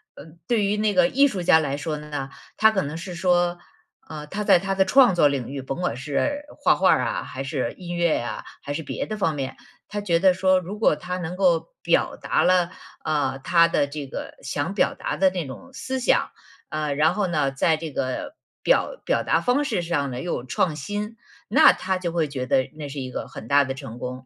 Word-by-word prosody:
嗯， 160 +3 -14
对 225 -4 +2
于 205 +1 0
那 210 -1 +1
个 270 -1 +5
艺 280 +2 +4
术 190 -8 -4
家 160 - +6
来 140 -2 -2
说 155 +1 -3
呢， 145 -2 -5 0.3
他 220 0 +6
可 195 - 0
能 150 +3 -5
是 180 +2 -7
说， 175 -1 +1 0.5
呃， 150 -1 -7
他 210 +6 -4
在 - - +6
他 195 +2 -2
的 190 - +4
创 250 +1 +6
作 160 -4 +5
领 135 -4 -2
域， 140 -1 -5
甭 135 +3 -5
管 175 - -1
是 150 - -2
画 - - +4
画 - - +3
儿 - - +3
啊 - - -2
还 135 +1 -6
是 135 -4 -2
音 175 -1 -7
乐 170 -2 +2
呀， 120 - -4 0.2
还 145 - -4
是 160 - -3
别 145 - -4
的 215 - -4
方 160 -6 0
面， 135 -2 -4 0.3
他 205 0 -4
觉 175 -5 +2
得 185 0 +5
说 185 0 +3
如 195 +4 -7
果 215 - +4
他 180 +4 -5
能 175 0 -4
够 180 -3 +2
表 - - +1
达 - - 0
了， 180 -1 +3 0.3
呃， 145 -4 0
他 170 +4 +4
的 155 - +1
这 145 -1 -6
个 - - -7
想 145 +6 -2
表 200 - +1
达 - - -4
的 190 0 +4
那 180 -3 -4
种 260 - -10
思 260 0 -4
想， 245 - +2 0.4
呃 155 -2 -2
然 155 +2 +3
后 205 -3 0
呢 150 -5 0
在 155 +3 +2
这 160 -1 -6
个 135 - -3 0.3
表 - - +2
表 - - +1
达 - - +2
方 255 +4 +1
式 200 -9 -1
上 145 -5 -1
呢 125 - -5
又 175 - -2
有 120 - -3
创 155 +5 0
新， 205 +9 -4 0.3
那 - - +7
他 185 0 -2
就 170 -2 -3
会 165 -3 0
觉 130 -3 -4
得 130 +1 +1
那 150 -2 -7
是 140 0 -6
一 130 -1 -5
个 - - -5
很 110 - -10
大 140 +3 +5
的 135 - -4
成 120 -2 -9
功。 125 +1 -6
170 Hz, 250 characters per minute, -24 LUFS, 140-190 Hz, 0.5 s, 那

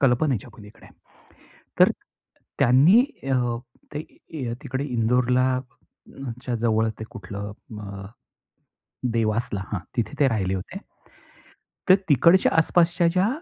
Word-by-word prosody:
कल्पनेच्या 125 -3 +1
पलीकडे. 105 0 -15 0.9
तर - - +7 0.7
त्यांनी 145 - +6 0.3
अ, 125 -3 +1 0.4
ते 150 - -3 0.6
तिकडे 135 +1 -3
इंदोरच्या 125 0 -2
जवळ 110 -1 +2
ते 110 - -5
कुठलं 100 -1 -7 0.3
अ, 100 -1 -8 1.1
देवासला 110 -2 0
हां, 105 - 0 0.2
तिथे 110 -4 -1
ते 140 - +5
राहिले 95 -6 -1
होते. 95 - -6 1.1
तर 185 - +9
तिकडच्या 170 +6 +5
आसपासच्या 170 +1 +3
ज्या, 185 +4 +2
125 Hz, 100 wpm, -24 LUFS, 110-140 Hz, 1.1 s, तर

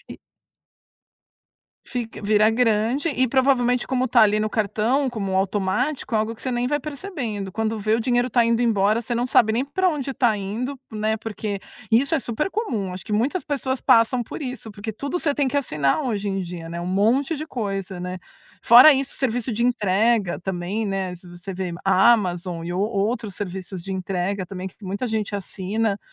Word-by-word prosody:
E - - -9 1.7
Fica 230 -3 -5
vira 210 +1 +4
grande 230 +6 +1
e 260 -2 +1
provavelmente 250 -1 +2
como 255 0 0
tá 235 -1 +5
ali 210 0 +4
no 215 - 0
cartão 220 +6 0
como 195 -5 -2
automático, 205 +8 -1
é 220 - +4
algo 220 +1 -1
que 225 - -17
você 260 - -2
nem 240 0 0
vai 290 +2 0
percebendo, 275 - -5
quando 220 +1 -1
vê, 215 +1 0
o 230 - +1
dinheiro 245 +1 +1
tá 240 - +4
indo 230 +1 +2
embora, 215 0 +2
você 240 +1 -3
não 240 +1 0
sabe 220 -3 +4
nem 245 +5 0
pra 370 +6 +1
onde 275 -4 -3
tá 240 -4 +3
indo, 230 +7 -4
né, 220 0 -1
porque 210 -2 -4 0.3
isso 275 +8 +4
é 320 - +3
super 255 - -2
comum, 235 - -2
acho 185 - -8
que 215 - -6
muitas 265 - 0
pessoas 270 -3 -2
passam 230 +2 +4
por 235 - -8
isso, 255 -5 -5
porque 210 +2 -6
tudo 280 - -3
você 290 -4 +1
tem 285 -1 +1
que 285 +2 +1
assinar 150 - 0
hoje 210 -6 -2
em 195 - -2
dia, 170 -2 -6
né, 170 0 -4
um 175 - -5
monte 230 - +2
de 310 +2 -5
coisa, 195 - -4
né? 180 0 -5 0.5
Fora 250 +6 +10
isso, 275 0 -2
serviço 245 -1 -1
de 230 +2 -1
entrega 215 -4 +2
também, 190 +4 -3
né, 190 -2 -2
se 180 +1 -13
você 175 +2 -8
ver, 180 -2 -4
Amazon 185 -4 +3
e 175 - -4
ou 180 - -1
outros 215 0 -1
serviços 190 -2 -5
de 195 - -5
entrega 190 +1 -2
também 185 0 -6
que - - -21
muita 200 +5 -3
gente 220 -2 -2
assina, 200 +2 -2
220 Hz, 195 wpm, -23 LUFS, 195-250 Hz, 1.7 s, Fora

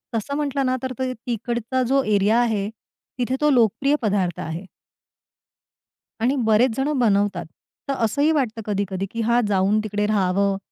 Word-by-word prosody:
तसं 225 +6 -2
म्हटलं 280 -2 -1
ना 255 0 +1
तर 260 0 -3
ते 255 -1 -1
तिकडचा 240 +1 -3
जो 275 +1 +3
एरिया 205 +4 +3
आहे, 210 -4 0 0.5
तिथे 250 +1 -1
तो 300 - +4
लोकप्रिय 270 +3 +3
पदार्थ 195 -6 0
आहे. 165 +4 -5 1.6
आणि 250 +5 +2
बरेच 220 +2 +3
जणं 275 0 0
बनवतात. 200 -6 +1 0.4
तर - - +2
असंही 285 +8 +2
वाटतं 245 -7 -1
कधी-कधी, 195 -2 -2
की 230 - -3
हां, 235 +2 +3
जाऊन 200 +1 +2
तिकडे 210 -1 -1
राहावं 200 -1 +1
225 Hz, 150 wpm, -22 LUFS, 200-260 Hz, 1.6 s, तो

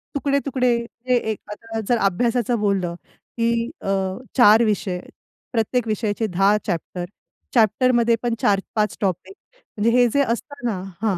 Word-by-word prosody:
तुकडे-तुकडे 275 -3 +1 0.3
हे 250 - +4 0.2
एक 215 - -5
आता 225 +1 -6
जर 240 - +4
अभ्यासाचं 235 +4 +1
बोललं 195 -4 0 0.4
की 230 0 +1
अ, - - -7 0.5
4 225 -1 +7
विषय, 200 -4 -1 0.5
प्रत्येक 230 +1 0
विषयाचे 215 +1 -1
10 195 +2 +3
चॅप्टर, 175 -1 -3 0.5
चॅप्टरमध्ये 235 +1 +3
पण 240 - 0
4-5 205 +1 0
टॉपिक, 195 - -2 0.4
म्हणजे 225 +3 +2
हे 245 - +5
जे 280 - +4
असत 240 +4 -3
ना 190 -5 -2 0.2
हां. 210 -5 +1
225 Hz, 135 wpm, -22 LUFS, 200-240 Hz, 0.5 s, 4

